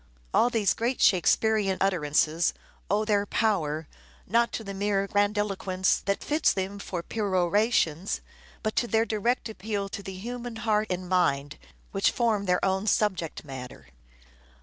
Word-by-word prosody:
All 240 - +4
these 220 -6 +2
great 240 +3 -1
Shakespearean 195 +1 +3
utterances 165 -3 +1 0.3
owe 210 +3 +1
their 205 -1 +1
power, 160 -10 0 0.4
not 235 +4 +2
to 225 - -3
the 195 -1 -6
mere 200 0 0
grandilo 205 0 +1
quence 185 -1 0
that 200 0 -1
fits 305 +2 +2
them 195 +1 -3
for 180 -3 -5
perorations, 195 -3 +1 0.4
but 215 -1 -1
'to 240 - +1
their 225 0 +2
direct 230 +2 0
appeal 205 -1 -4
to 200 - -6
the 190 -1 -7
human 240 +4 -6
heart 215 -1 +1
and 180 0 -3
mind 145 -6 +1 0.3
which 195 0 -2
'THE - - +5
TEMPEST' - - -13
509 235 -2 +3
form 200 - -6
their 180 +1 +2
own 190 +2 0
subject 190 -8 0
matter. 125 - -9
200 Hz, 160 wpm, -27 LUFS, 185-220 Hz, 0.4 s, THE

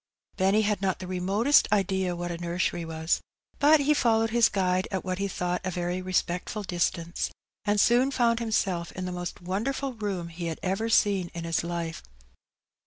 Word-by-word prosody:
Benny 195 +3 +3
had 205 -2 0
not 190 -1 0
the 185 - -7
remotest 195 +9 +3
idea 190 -3 +1
what 175 0 -4
a 170 - -4
nursery 175 0 -1
was, 160 0 -1 0.4
but 300 +1 +6
he 295 +2 +3
followed 225 -5 +2
his 235 -1 +5
guide 185 -1 +1
at 190 -2 -3
what 185 0 -2
he 200 - 0
thought 180 -1 -2
a 185 - -1
very 180 +1 -2
respectftd 185 +3 -2
distance, 170 -1 -1 0.4
aud 205 0 +3
soon 245 +5 +4
found 235 -3 +2
himself 195 -7 -1
in 185 - -5
the 180 - -3
most 175 0 -5
wonderful 250 +9 -2
room 200 -6 -3
he 170 +1 -5
had 160 - -3
ever 195 +5 -1
seen 195 -5 +3
in 170 - -4
his 165 -1 0
life. 170 -1 -4
185 Hz, 180 wpm, -27 LUFS, 175-215 Hz, 0.4 s, but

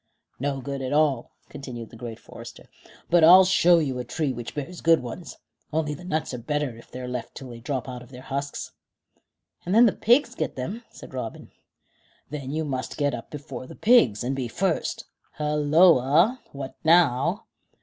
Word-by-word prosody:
"No 135 0 -2
good 140 +1 -5
at 130 +1 -3
all," 145 -5 +2 0.2
continued 125 -5 -8
the - - -12
great 115 -1 -7
forester; - - -12 0.4
"but 175 -1 +5
I'll 185 +3 +9
show 175 -2 +5
you 135 -6 -1
a - - -3
tree 140 +2 -2
which 120 -1 -7
bears 160 +5 -6
good 165 -4 +4
ones, 125 +9 -8 0.3
only 155 -1 -1
the 145 - -10
nuts 155 -6 -2
are 125 - -4
better 145 0 -2
if 115 - -15
they're 125 0 -7
left 125 -2 -5
till 130 - -8
they 115 - -9
drop 130 +2 -3
out 125 -1 -6
of 125 - -14
their 130 -1 -11
husks." 140 +1 -4 0.9
"And 180 +3 -1
then 235 +2 +8
the 225 - +5
pigs 240 +9 +3
get - - -3
them," 195 - -5
said - - -13
Robin. 125 -4 -6 0.8
"Then 140 -3 -5
you 155 +2 -2
must 130 -3 -4
get 145 -2 +1
up - - -7
before 145 -3 -8
the - - -11
pigs, 150 - +4
and 130 +3 -1
be 130 -2 -2
first. 180 +7 -1 0.3
Halloa! 150 - +4
What 140 -1 -7
now?" 165 - +3
140 Hz, 185 wpm, -25 LUFS, 125-165 Hz, 0.9 s, I'll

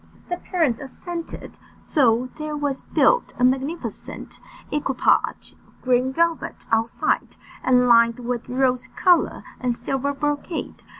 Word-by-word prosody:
The 355 - -1
parents 320 -11 0
assented. 335 +5 -7 0.2
So 250 -3 +2
there 305 0 -3
was 285 -2 -2
built - - +2
a 245 - -1
magnificent 270 +6 -2 0.3
equipage 280 -3 +1
of - - -28
green 255 +1 +2
velvet 335 +3 -1
outside, 225 +1 0 0.3
and 250 -1 +4
lined 235 -1 +5
with 245 0 -4
rose 255 0 +1
colour 360 -2 +3 0.2
and 245 -2 0
silver 270 +3 -2
brocade. 295 +3 -3
265 Hz, 120 wpm, -23 LUFS, 250-305 Hz, 0.3 s, lined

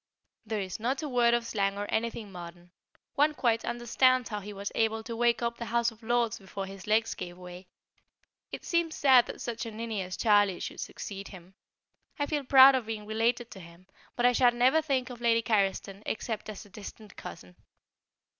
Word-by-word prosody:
There 215 0 -2
is 185 +1 -5
not 260 +6 -1
a - - -2
word 240 -3 +3
of 240 -1 -1
slang 200 -3 -1
or 205 - -2
anything 225 -2 -2
modern; 175 0 -10 0.4
one 300 +2 +2
quite 230 -4 +1
understands 250 +1 +2
how 210 -2 -3
he 205 +1 -8
was 200 0 -5
able 225 0 0
to 230 +1 -6
wake 235 0 +2
up 235 0 -1
the 235 - -4
House 235 0 +1
of 225 +1 -19
Lords 235 0 0
before 195 0 -6
his 195 0 -10
legs 225 +1 +2
gave 175 0 -8
way. 180 0 -11 0.8
It - - -7
seems 340 -2 0
sad 260 -4 +5
that - - -8
such 235 -1 -4
a - - -6
ninny 220 -1 -4
as 185 0 -5
Charlie 205 -4 +3
should - - -6
succeed 200 -1 -6
him. 185 -1 -13 0.6
I 290 - 0
feel 295 -1 -2
proud 265 +1 +8
of 255 -4 -1
being 215 -2 -5
related 230 +2 0
to 195 - -10
him, 170 +1 -14 0.3
but 240 - +1
I 245 - +6
shall 245 0 +4
never 255 +6 +4
think 265 -4 -1
of 240 -1 -10
Lady 230 -1 +3
Carriston 200 -2 0
except 220 -1 -3
as 210 - -8
a - - -17
distant 210 +1 -11
cousin. 90 +1 -10
225 Hz, 200 wpm, -29 LUFS, 200-240 Hz, 0.8 s, proud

